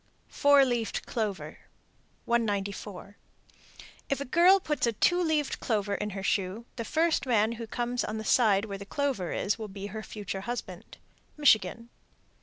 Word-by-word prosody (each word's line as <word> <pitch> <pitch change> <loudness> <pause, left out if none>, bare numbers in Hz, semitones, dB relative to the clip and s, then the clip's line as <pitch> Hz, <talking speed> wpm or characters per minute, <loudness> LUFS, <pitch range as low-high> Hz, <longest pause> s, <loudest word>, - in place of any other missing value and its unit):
_ - - -25
FOUR 285 -1 +5
LEAVED 240 -3 -2
CLOVER. 215 -4 -4 0.7
194. 205 -3 -2 0.9
If 275 - 0
a 280 - -4
girl 350 +8 +5
puts 300 -8 -1
a 235 - +1
two 350 - +2
leaved 310 -4 0
clover 205 -3 -1
in 210 +1 -2
her 195 - -5
shoe, 195 +3 -1
the 230 - -4
first 320 +2 +1
man 220 -2 +3
who 230 0 -6
comes 240 +2 -2
on 215 - -3
the 220 - -5
side 210 -4 +4
where 200 -2 -6
the 200 - -8
clover 265 - -1
is 205 +3 -1
will 220 - -5
be 195 0 -8
her 220 - -4
future 205 -3 -6
husband. 240 +4 -6 0.4
_Michigan. 230 -5 +3
225 Hz, 165 wpm, -28 LUFS, 200-270 Hz, 0.9 s, FOUR